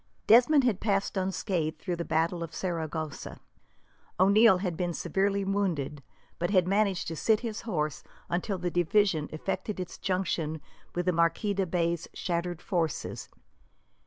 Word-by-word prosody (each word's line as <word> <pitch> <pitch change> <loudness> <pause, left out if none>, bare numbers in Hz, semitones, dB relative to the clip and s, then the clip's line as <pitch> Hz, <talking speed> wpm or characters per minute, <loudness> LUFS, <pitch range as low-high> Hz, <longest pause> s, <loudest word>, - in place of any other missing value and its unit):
Desmond 250 +6 +6
had 230 -6 +1
passed 200 -2 0
unscathed 185 -4 -1
through 175 +1 -3
the 170 - -2
battle 165 +2 0
of 165 -1 -6
Saragossa. 160 -4 -4 0.8
O'Neil 200 +2 +6
had 180 -2 -2
been 175 0 -2
severely 195 +3 0
wounded, 175 -8 -1 0.4
but 175 - 0
had 185 -3 +3
managed 195 -1 +1
to 165 - -4
sit 215 +6 +2
his 225 -3 -4
horse 155 -9 -2 0.2
until 185 +3 -1
the 175 -1 -2
division 175 -2 +2
effected 195 +5 -3
its 180 - -6
junction 170 -4 -1 0.4
with 175 0 -1
the 180 - +3
Marquis 170 +5 +1
de 195 -1 0
Bay's 170 -1 0
shattered 175 -1 -2
forces. 165 -5 -2
180 Hz, 145 wpm, -29 LUFS, 165-200 Hz, 0.8 s, Desmond